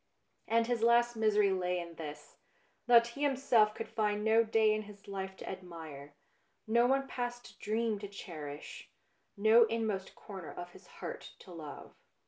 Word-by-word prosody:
And 230 +1 +3
his 240 -1 -1
last 235 +1 +4
misery 210 -2 +3
lay 180 -1 0
in 170 -1 -7
this: 150 -2 -9 0.5
that 235 -1 +6
he 275 +4 -9
himself 255 -7 +3
could 225 - -5
find 210 -1 0
no 220 +1 +5
day 220 -1 +3
in 215 - -1
his 205 -1 -13
life 190 -1 -5
to - - -9
admire, 160 -6 -8 0.5
no 235 +2 +4
one 270 +1 +2
past 245 -1 -5
dream 220 0 -1
to 205 - -6
cherish, 155 -7 -8 0.5
no 220 +3 +6
inmost 220 -4 -2
corner 190 -6 -9
of 175 0 -8
his - - -16
heart - - -7
to 185 - -13
love. 155 -4 -9
210 Hz, 160 wpm, -33 LUFS, 180-230 Hz, 0.5 s, that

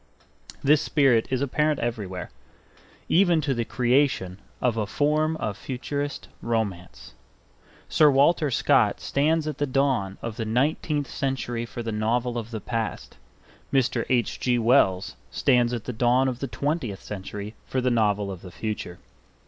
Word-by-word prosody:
This 150 +2 +5
spirit 135 -7 +3
is 130 -1 0
apparent 150 +2 +1
everywhere, 100 -7 -4 0.8
even 175 -2 +4
to 140 -2 0
the 120 -2 -1
creation 125 -7 +1 0.2
of 125 -3 +1
a 110 -2 -1
form 155 +5 +1
of 105 -7 -3
futurist 140 +4 -4
romance. 105 -6 -3 0.7
Sir 150 - +5
Walter 145 +3 +3
Scott 125 - +3
stands 155 +3 +1
at 150 -3 -4
the 145 - +1
dawn 130 -8 0
of 115 -2 -5
the 115 - -2
nineteenth 145 +5 0
century 120 -4 -3
for 120 - -6
the 115 - -3
novel 115 +3 0
of 115 -1 -7
the 110 -2 -5
past; 115 +1 -4 0.5
Mr. 125 -3 +2
H. 125 -2 +1
G. 125 -1 +1
Wells 110 -6 +2
stands 120 -3 +2
at 120 -3 -3
the 125 - -5
dawn 125 +3 +3
of 125 -2 -3
the 140 - -3
twentieth 140 - -3
century 105 +1 -6
for 130 - -1
the 125 0 +1
novel 105 -3 +1
of 95 -2 -8
the 90 - -10
future. 105 -2 -5
125 Hz, 155 wpm, -25 LUFS, 110-140 Hz, 0.8 s, This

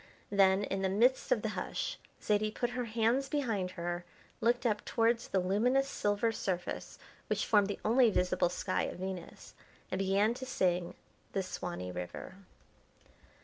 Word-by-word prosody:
Then, 195 0 +4
in 195 -1 -2
the 190 - +1
midst 245 - +3
of - - +3
the - - 0
hush, - - -3 0.2
Zaidie 215 0 +1
put 240 0 -1
her 250 0 -2
hands 230 +4 +1
behind 225 -11 0
her, 175 +1 -3 0.4
looked 240 +1 +2
up 215 -3 +1
towards 230 0 +1
the 195 - +1
luminous 235 +9 +2
silver 205 -2 +1
surface 180 -5 -3 0.3
which - - 0
formed 205 -2 +4
the 205 - -4
only 235 +2 +5
visible 180 -3 +2
sky - - -1
of - - -5
Venus, 185 -1 -7 0.4
and 185 - -1
began 195 +3 +3
to 260 +2 -6
sing 180 -7 0 0.4
"The 195 - 0
Swanee 175 - -5
River." 90 - -6
205 Hz, 155 wpm, -32 LUFS, 185-235 Hz, 0.4 s, only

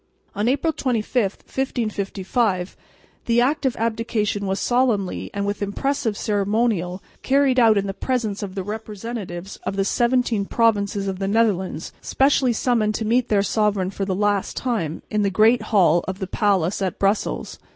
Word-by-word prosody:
On 210 +4 0
October 295 +4 0
25, 230 -4 0
1555, 205 -5 -1 0.5
the 235 0 +3
act 270 +3 +2
of 255 - -1
abdication 220 -3 -1
was 190 +1 -1
solemnly 240 -7 0
and 200 -1 -2
with 205 +1 -3
impressive 225 +2 -1
ceremonial 200 -3 0 0.2
carried 270 -1 +3
out 225 -3 +5
in 200 - +1
the 195 - -3
presence 220 -3 -2
of 195 -2 -6
the 190 - -3
representatives 210 -3 -6
of - - -5
the 195 0 0
seventeen 235 -2 +1
provinces 205 -3 +1
of 190 -1 -3
the 195 - -1
Netherlands 195 -6 0
specially 270 -2 +2
summoned 220 -2 +1
to 220 - -2
meet 240 +3 +1
their 200 -2 +3
sovereign 205 -3 0
for 200 - -4
the 190 -1 -1
last 205 0 0
time 215 - -2
in 210 - +1
the 200 - +2
Great 220 +5 +4
Hall 175 -5 +4
of 190 0 -3
the 195 - -3
Palace 195 -2 +1
at 190 -2 -1
Brussels. 200 +2 -1
210 Hz, 160 wpm, -22 LUFS, 195-235 Hz, 0.5 s, out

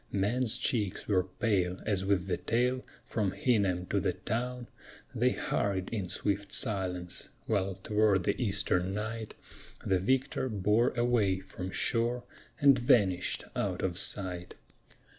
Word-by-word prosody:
Men's 110 +4 +1
cheeks 105 -7 -1
were 95 -3 +3
pale 95 -2 0
as 100 -4 0
with 95 -2 +1
the 95 - 0
tale 125 +2 0 0.2
from 105 -4 -1
Hingham 100 -10 +1
to 100 - +2
the 95 -1 0
town 120 +6 -3 0.5
They - - +3
hurried 95 -2 -1
in 100 -6 -3
swift 100 +2 -2
silence, 90 -4 -2 0.2
while 100 -3 0
toward 105 -1 +2
the - - 0
eastern 95 -4 0
night 110 +1 -4 0.5
The 95 -1 +2
victor 130 +5 0
bore 105 +3 +2
away 115 -6 +2
from 95 -1 -7
shore 120 +4 0 0.4
and 140 -3 +6
vanished 105 -8 +2
out - - -1
of 90 -1 +1
sight. 90 -3 -1
100 Hz, 135 wpm, -31 LUFS, 95-115 Hz, 0.5 s, and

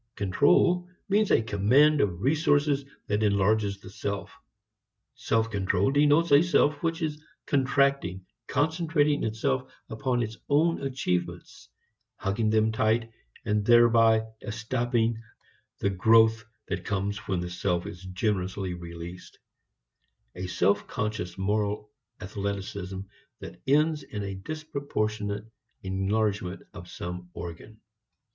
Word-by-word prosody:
Control 145 - +3 0.2
means 210 +1 +3
a 115 - +4
command 130 +9 +4
of 95 -2 -1
resources 145 -1 +2 0.2
that 105 +1 0
enlarges 100 0 +2
the - - -11
self; 100 +6 -4 0.8
self 115 0 0
control 100 +2 +1
denotes 150 +3 +3
a 140 +1 +8
self 155 -4 +2
which 165 0 -1
is 150 -1 -3 0.2
contracting, 135 -9 +1 0.2
concentrating 150 0 +1
itself 110 -12 -1 0.2
upon 120 +1 0
its 110 0 -6
own 160 +4 +3
achievements, 130 - -3 0.5
hugging 110 +3 -1
them 110 0 +3
tight, 115 +1 +1 0.3
and 105 -2 +1
thereby 115 -1 +5 0.2
estopping 115 +1 -1 0.6
the 100 - 0
growth 110 +3 +4 0.2
that - - -3
comes 100 0 -2
when 95 -2 0
the 90 0 -4
self 90 -1 -1
is 90 - -8
generously 95 -1 -2
released; 85 +1 -9 1.0
a 90 +1 -5
self 100 +2 +1
conscious 105 -6 -3
moral 105 +1 -1 0.3
athleticism 95 -1 -4 0.4
that - - -10
ends 150 +2 +3
in 105 -6 -6
a 100 -1 -4
disproportionate 110 -5 -3 0.4
enlargement 95 0 -1
of 95 -4 -10
some 90 0 -7
organ. 85 +6 -8
110 Hz, 115 wpm, -27 LUFS, 95-140 Hz, 1.0 s, a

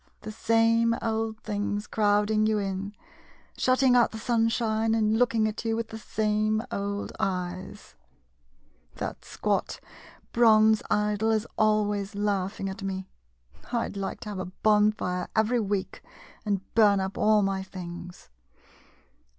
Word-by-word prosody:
The 215 - -7
same 230 +1 +2
old 220 -1 -2
things 205 0 -2
crowd 210 0 +1
ing 215 0 +3
you 215 -1 +2
in, 200 0 -3 0.6
shutting 255 0 +3
out 240 - +5
the 220 - -8
sunshine, 225 -1 +1
and 220 0 +2
looking 230 -3 +2
at 215 +1 -4
you 225 -1 0
with 230 0 -3
the 220 - -7
same 215 0 0
old 200 0 -3
eyes! 185 -1 -4 1.0
That - - -5
squat - - -2 0.5
bronze 220 -2 +5
idol 210 +1 +1
is 220 0 +1
always 210 -2 +1
laughing 200 -1 -1
at 190 +1 -6
me. 190 -1 -4 0.6
I 235 -2 0
'd - - -11
like 195 -1 -4
to 215 - -7
have 200 -2 -5
a 185 - -3 0.2
bonfire 210 -4 +2
every 220 +3 +2
week 200 -3 -2 0.5
and 200 -2 0
burn 205 -3 +5
up 190 +1 -3
all 215 -1 +3
my 195 0 -1
things. 180 - -9
215 Hz, 140 wpm, -27 LUFS, 200-220 Hz, 1.0 s, out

